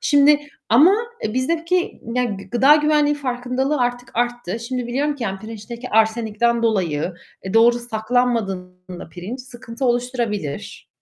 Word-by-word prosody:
Şimdi 290 +1 +5 0.3
ama, 300 - +6 0.3
eee, 215 - -2
bizdeki, 335 +7 0
yani, 220 -6 -2
gıda 265 +5 +6
güvenliği 300 -1 +3
farkındalığı 260 +1 -2
artık 245 0 -1
arttı. 240 -3 -2
Şimdi 245 +1 -3
biliyorum 285 +5 0
ki, 255 - -6
yani 195 -2 -3
pirinçteki 225 +3 -8
arsenikten 220 +1 +2
dolayı, 180 -7 0 0.3
eee, 190 +3 -5
doğru 235 +1 +5
saklanmadığında 215 -7 -2
pirinç 190 +10 -7
sıkıntı 245 0 -7
oluşturabilir 240 - -2
240 Hz, 125 wpm, -21 LUFS, 215-255 Hz, 0.3 s, ama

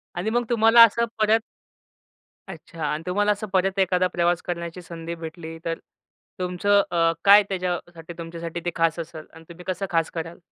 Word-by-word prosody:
आणि 180 +5 -2
मग 240 +2 +1
तुम्हाला 230 0 +7
असं 235 +1 +4
परत 215 +1 +4 1.1
अच्छा. 165 -3 -10
आणि 150 +1 -2
तुम्हाला 205 +3 +2
असं 210 +1 -5
परत 190 +1 +1
एखादा 185 -1 +2
प्रवास 175 -1 0
करण्याची 170 0 -5
संधी 165 0 -7
भेटली, 165 0 -8
तर 165 0 -2 0.6
तुमचं 185 +3 +2
अ, 165 -1 +2
काय 205 +1 +8
त्याच्यासाठी 175 -3 -4
तुमच्यासाठी 170 0 -6
ते 175 - 0
खास 165 0 +1
असलं? 160 -1 -7
आणि 160 0 -14
तुम्ही 170 +1 -12
कसं 185 +2 -2
खास 165 -2 +1
करालं? 165 0 -6
175 Hz, 165 wpm, -24 LUFS, 165-195 Hz, 1.1 s, काय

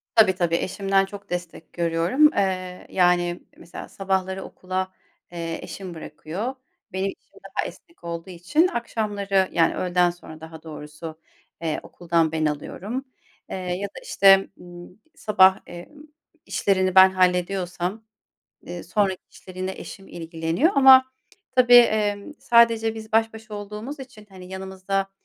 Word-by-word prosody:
Tabii, 200 -5 +6
tabii, 170 -2 +1
eşimden 195 +1 +1
çok 200 -1 -11
destek 175 -2 -6
görüyorum. 170 - +3
Eee, 185 -2 -2
yani, 175 -1 +2
mesela 170 - -10
sabahları 190 -1 -2
okula, 185 0 -4 0.4
eee, 165 -1 -4
eşim 180 +1 -8
bırakıyor. 170 - -6 0.4
Benim 190 +1 -1
işim - - -10
daha - - -3
esnek 335 - -12
olduğu 170 +1 -6
için 290 - +1
akşamları, 205 - -1
yani, 165 -1 +2
öğleden 180 -1 +2
sonra 160 -2 -10
daha 160 0 -11
doğrusu, 155 +1 -9 0.4
eee, 160 -2 -2
okuldan 165 -2 0
ben 160 -1 0
alıyorum. 200 - -4 0.4
Eee, - - -4
ya 185 +2 -3
da, - - -12
işte, 195 -1 +5
ımm, 175 +2 -13 0.2
sabah, 190 -2 +4
emm, 235 - -11 0.4
işlerini 185 -2 +1
ben 190 0 +9
hallediyorsam, 180 +2 0 0.6
eee, 175 -1 -7
sonraki 190 +1 0
işleri 185 0 -13
yine 185 +1 -2
eşim 195 0 -10
ilgileniyor 165 - -1
ama, 265 -1 +8 0.5
tabii, 245 -1 +6
emm, 215 0 +4
sadece 230 -1 +4
biz 220 -1 -10
baş 225 0 +3
başa 220 -1 -10
olduğumuz 210 +8 -7
için, 220 -5 -12
hani, 185 -1 -12
yanımızda 190 +1 -3
190 Hz, 135 wpm, -24 LUFS, 175-210 Hz, 0.6 s, ben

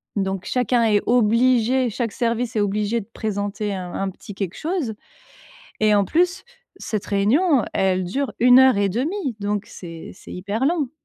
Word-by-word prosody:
Donc 195 -2 -2
chacun 250 -1 +1
est 210 -2 +3
obligé, 245 +2 +3
chaque 230 0 -3
service 235 0 -1
est - - +2
obligé 210 +3 0
de 195 - -14
présenter 205 -1 -3
un 180 -2 -6
un 195 0 -2
petit 195 +2 -11
quelque 190 -2 -4
chose 315 -9 -2 0.9
et 215 -1 +4
en 200 - +4
plus, 360 - +1 0.3
cette 215 -3 -4
réunion, 245 - +2
elle 185 -1 +1
dure 270 +10 -2
1 250 +1 +7
heure 260 -5 +6
1/2, 255 - -1
donc 205 0 -2
c'est 165 -2 -10
c'est - - -13
hyper 205 +7 -2
long. 305 -5 +1
220 Hz, 165 wpm, -22 LUFS, 200-255 Hz, 0.9 s, 1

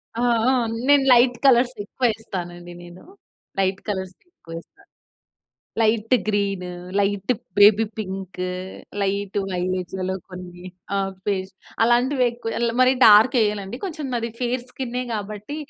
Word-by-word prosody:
ఆ! 235 - -2 0.3
ఆ! - - +4 0.4
నేను 285 -1 +5
లైట్ 245 0 +4
కలర్స్ 250 -1 +4
ఎక్కువ 250 +5 -3
వేస్తానండి 175 -5 -7
నేను. 175 +1 -13 0.6
లైట్ 190 0 +1
కలర్స్ 190 -2 -4
ఎక్కువ 165 - -14
వేస్తా. 400 - -14 1.0
Light 225 +2 +2
green, 200 -3 0 0.3
light 200 0 0 0.3
baby 205 +2 +7
pink, 190 -3 -6 0.6
light 200 0 -2
వైలెట్లలో 185 +1 -2 0.2
కొన్ని 180 -1 -10 0.3
ఆహ్, 195 -1 -1
ఫేస్ 195 -1 -2 0.3
అలాంటివి 250 +3 +3
ఎక్కువ 235 -1 -6
ల్ 235 - +1
మరి 255 0 +6
డార్క్ 220 +5 +7
వెయ్యనండి. 210 -1 -1
కొంచెం 315 -6 -5
నాది 230 -1 -2
ఫేర్ 245 0 -1
స్కిన్నే 250 -1 -4
కాబట్టి, 210 +5 -6
205 Hz, 125 wpm, -22 LUFS, 190-240 Hz, 1.0 s, baby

